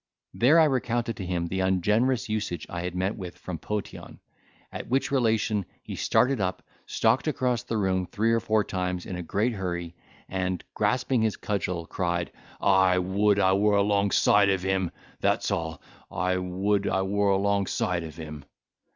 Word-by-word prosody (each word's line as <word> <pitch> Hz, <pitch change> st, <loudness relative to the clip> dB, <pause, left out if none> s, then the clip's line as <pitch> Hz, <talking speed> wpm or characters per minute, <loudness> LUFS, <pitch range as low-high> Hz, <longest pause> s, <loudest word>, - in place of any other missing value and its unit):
There 140 Hz, +8 st, +5 dB
I -, -, +7 dB
recounted 120 Hz, -5 st, 0 dB
to 95 Hz, -, -5 dB
him 90 Hz, -2 st, -1 dB
the 95 Hz, +3 st, -3 dB
ungenerous 105 Hz, +7 st, +2 dB
usage 105 Hz, -6 st, -3 dB
I 85 Hz, -, -3 dB
had 90 Hz, 0 st, -4 dB
met 95 Hz, +3 st, -1 dB
with 90 Hz, -4 st, -8 dB
from 85 Hz, -4 st, -6 dB
Potion; 105 Hz, -1 st, -6 dB, 0.5 s
at -, -, -6 dB
which 135 Hz, +2 st, 0 dB
relation 110 Hz, -5 st, +1 dB, 0.2 s
he -, -, -6 dB
started 130 Hz, -3 st, +2 dB
up, 90 Hz, -1 st, -2 dB, 0.2 s
stalked 115 Hz, +5 st, +1 dB
across 125 Hz, -6 st, 0 dB
the 115 Hz, -, -3 dB
room 95 Hz, -3 st, 0 dB
three 110 Hz, +5 st, 0 dB
or 115 Hz, -, +3 dB
four 110 Hz, -1 st, +1 dB
times 90 Hz, -2 st, -3 dB
in 95 Hz, -, -5 dB
a 90 Hz, -, -4 dB
great 105 Hz, +8 st, 0 dB
hurry, 85 Hz, -4 st, -4 dB, 0.3 s
and, 95 Hz, -1 st, -2 dB
grasping 125 Hz, +3 st, +1 dB
his 110 Hz, -1 st, 0 dB
cudgel, 90 Hz, -5 st, -2 dB
cried, 85 Hz, 0 st, -2 dB, 0.3 s
"I 95 Hz, -2 st, +4 dB
would 100 Hz, +3 st, +2 dB
I 95 Hz, -1 st, +4 dB
were 105 Hz, +1 st, +3 dB
alongside 100 Hz, 0 st, +3 dB
of 95 Hz, -2 st, 0 dB
him—that's 95 Hz, -2 st, -1 dB
all—I 85 Hz, +2 st, -3 dB
would 95 Hz, +3 st, 0 dB
I 95 Hz, 0 st, +1 dB
were 100 Hz, +1 st, +1 dB
alongside 100 Hz, -2 st, +1 dB
of 80 Hz, -2 st, -8 dB
him!" 75 Hz, -3 st, -8 dB
95 Hz, 160 wpm, -27 LUFS, 90-110 Hz, 0.5 s, I